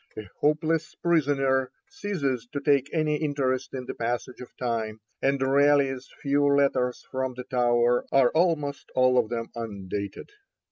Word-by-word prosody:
A 110 Hz, -1 st, -6 dB
hopeless 155 Hz, +1 st, +1 dB
prisoner 135 Hz, -6 st, +1 dB, 0.2 s
ceases 140 Hz, -, -2 dB
to 145 Hz, -, -1 dB
take 140 Hz, -1 st, +2 dB
any 155 Hz, -2 st, +1 dB
interest 135 Hz, -4 st, -1 dB
in 130 Hz, -1 st, -5 dB
the -, -, -5 dB
passage 120 Hz, +2 st, -3 dB
of 125 Hz, -, -10 dB
time, 115 Hz, -3 st, -2 dB, 0.2 s
and 140 Hz, 0 st, +2 dB
Raleigh's 135 Hz, -1 st, +2 dB
few 145 Hz, 0 st, +2 dB
letters 140 Hz, -3 st, +1 dB
from 130 Hz, -1 st, -2 dB
the 125 Hz, -, -6 dB
Tower 120 Hz, -1 st, +2 dB
are 135 Hz, -3 st, +4 dB
almost 160 Hz, -4 st, 0 dB
all 130 Hz, 0 st, +4 dB
of 110 Hz, -, 0 dB
them 115 Hz, -1 st, -3 dB
undated. 100 Hz, -, -5 dB
135 Hz, 145 wpm, -26 LUFS, 125-145 Hz, 0.2 s, are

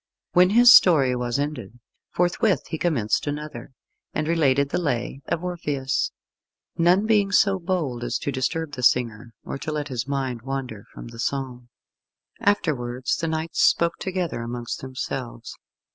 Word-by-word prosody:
When 180 Hz, 0 st, +5 dB
his 240 Hz, +4 st, +8 dB
story 140 Hz, -8 st, +6 dB
was 120 Hz, 0 st, -2 dB
ended, 140 Hz, -7 st, -4 dB, 0.3 s
forthwith 180 Hz, +3 st, +1 dB
he 160 Hz, -, -4 dB
commenced 135 Hz, -9 st, 0 dB
another, 145 Hz, -4 st, -6 dB, 0.4 s
and 155 Hz, -, -1 dB
related 140 Hz, -4 st, +2 dB
the 175 Hz, -, -1 dB
Lay 135 Hz, -2 st, -2 dB
of 170 Hz, -, -2 dB
Orpheus; 150 Hz, -7 st, -2 dB, 0.7 s
none 180 Hz, +5 st, +3 dB
being 210 Hz, -3 st, +2 dB
so 195 Hz, -1 st, +3 dB
bold 165 Hz, -9 st, -2 dB
as -, -, -1 dB
to 140 Hz, -, -3 dB
disturb 145 Hz, +4 st, -2 dB
the 135 Hz, -3 st, -6 dB
singer, 115 Hz, -2 st, +1 dB
or -, -, -6 dB
to 155 Hz, -, -4 dB
let 150 Hz, -1 st, -3 dB
his 125 Hz, -2 st, -3 dB
mind 135 Hz, -4 st, -2 dB
wander 130 Hz, -5 st, -5 dB
from -, -, -10 dB
the 115 Hz, 0 st, -12 dB
song. 125 Hz, -1 st, -3 dB, 0.7 s
Afterwards 130 Hz, -11 st, 0 dB
the 165 Hz, -, -2 dB
knights 160 Hz, +1 st, -2 dB
spoke 170 Hz, 0 st, +3 dB
together 180 Hz, -8 st, -3 dB
amongst 120 Hz, 0 st, -5 dB
themselves. 130 Hz, -2 st, -6 dB
140 Hz, 150 wpm, -24 LUFS, 125-170 Hz, 0.7 s, his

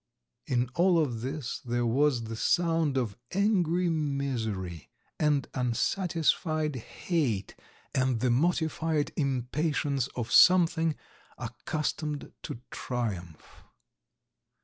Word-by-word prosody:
In 125 Hz, -1 st, +1 dB
all 175 Hz, +2 st, +4 dB
of 125 Hz, -8 st, 0 dB
this 135 Hz, +1 st, -4 dB
there 120 Hz, -1 st, -1 dB
was 130 Hz, +1 st, +2 dB
the 115 Hz, 0 st, -5 dB
sound 165 Hz, +1 st, +2 dB
of 115 Hz, -4 st, -2 dB
angry 180 Hz, -3 st, +2 dB
misery 125 Hz, -, -2 dB, 0.3 s
and 150 Hz, -2 st, +2 dB
unsatisfied 155 Hz, -, 0 dB
hate, 125 Hz, -, -2 dB, 0.4 s
and 130 Hz, -2 st, +1 dB
the 125 Hz, +1 st, +2 dB
mortified 160 Hz, +1 st, +1 dB
impatience 140 Hz, 0 st, 0 dB
of 120 Hz, -2 st, -3 dB
something 165 Hz, -3 st, +6 dB, 0.4 s
accustomed 150 Hz, +4 st, -3 dB
to 115 Hz, -, -7 dB
triumph. 95 Hz, -10 st, -5 dB
140 Hz, 95 wpm, -29 LUFS, 120-160 Hz, 0.4 s, something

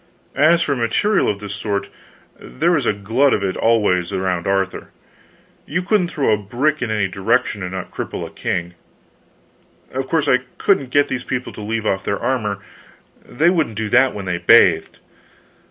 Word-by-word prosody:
As 165 Hz, +5 st, +4 dB
for 140 Hz, -, 0 dB
material 130 Hz, -, +1 dB
of 100 Hz, -, -1 dB
this 105 Hz, 0 st, -6 dB
sort, 100 Hz, -1 st, -3 dB, 0.5 s
there 165 Hz, +6 st, -1 dB
was 145 Hz, -8 st, +1 dB
a -, -, +4 dB
glut 115 Hz, +7 st, +1 dB
of -, -, -3 dB
it 95 Hz, -1 st, -1 dB
always 105 Hz, -6 st, +1 dB
around 95 Hz, -3 st, -2 dB
Arthur. 95 Hz, -1 st, -1 dB, 0.8 s
You 175 Hz, +5 st, -2 dB
couldn't 200 Hz, -2 st, +2 dB
throw 140 Hz, -9 st, +1 dB
a -, -, +2 dB
brick 125 Hz, +10 st, -1 dB
in 120 Hz, -, -2 dB
any 105 Hz, -3 st, 0 dB
direction 105 Hz, +3 st, 0 dB
and 90 Hz, 0 st, -4 dB
not 95 Hz, -1 st, -6 dB
cripple -, -, -5 dB
a -, -, -10 dB
king. 90 Hz, -1 st, -3 dB, 1.2 s
Of 130 Hz, 0 st, -3 dB
course, 160 Hz, -1 st, 0 dB
I 125 Hz, -, +4 dB, 0.2 s
couldn't 140 Hz, -10 st, +1 dB
get 145 Hz, +2 st, +3 dB
these 125 Hz, -, -3 dB
people 125 Hz, 0 st, -4 dB
to -, -, -9 dB
leave 110 Hz, +1 st, -3 dB
off 95 Hz, -2 st, 0 dB
their 100 Hz, -, -1 dB
armor; 115 Hz, -5 st, -1 dB, 0.7 s
they 165 Hz, +7 st, +1 dB
wouldn't 155 Hz, -, -1 dB
do 110 Hz, -1 st, -2 dB
that 130 Hz, +2 st, +3 dB
when 100 Hz, -2 st, -6 dB
they 90 Hz, -2 st, -2 dB
bathed. -, -, +4 dB
115 Hz, 180 wpm, -19 LUFS, 100-140 Hz, 1.2 s, As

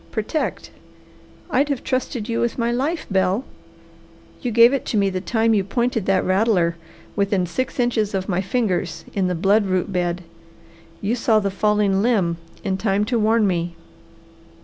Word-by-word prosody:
Protect! 220 Hz, +8 st, -3 dB, 0.8 s
I'd 285 Hz, +1 st, +2 dB
have 275 Hz, -4 st, -2 dB
trusted 255 Hz, -4 st, -2 dB
you 230 Hz, -1 st, -1 dB
with 235 Hz, -, -1 dB
my 235 Hz, -1 st, 0 dB
life, 285 Hz, +7 st, -1 dB
Bell! 190 Hz, +6 st, +1 dB, 1.0 s
You 250 Hz, -, -2 dB
gave 235 Hz, +2 st, +6 dB
it 275 Hz, -, 0 dB
to 220 Hz, -, 0 dB
me 200 Hz, -1 st, +2 dB
the 185 Hz, 0 st, -3 dB
time 225 Hz, +2 st, +1 dB
you 200 Hz, -3 st, +2 dB
pointed 235 Hz, 0 st, -1 dB
that 195 Hz, -1 st, +2 dB
rattler 185 Hz, -3 st, +2 dB, 0.4 s
within 200 Hz, -2 st, +1 dB
six 255 Hz, +10 st, -3 dB
inches 220 Hz, -4 st, +1 dB
of 190 Hz, -1 st, -2 dB
my 185 Hz, -1 st, 0 dB
fingers 185 Hz, -6 st, -1 dB
in 190 Hz, -2 st, +1 dB
the 180 Hz, -, -1 dB
blood 200 Hz, +4 st, +3 dB
root 185 Hz, +1 st, -1 dB
bed. 175 Hz, 0 st, -1 dB, 0.8 s
You 210 Hz, +3 st, 0 dB
saw 230 Hz, -2 st, +2 dB
the 200 Hz, -2 st, 0 dB
falling 205 Hz, -1 st, +2 dB
limb 200 Hz, -8 st, +1 dB, 0.3 s
in 190 Hz, -3 st, -1 dB
time 205 Hz, -1 st, +1 dB
to 235 Hz, +1 st, 0 dB
warn 220 Hz, 0 st, +3 dB
me. 170 Hz, -2 st, -1 dB
210 Hz, 170 wpm, -22 LUFS, 185-235 Hz, 1.0 s, gave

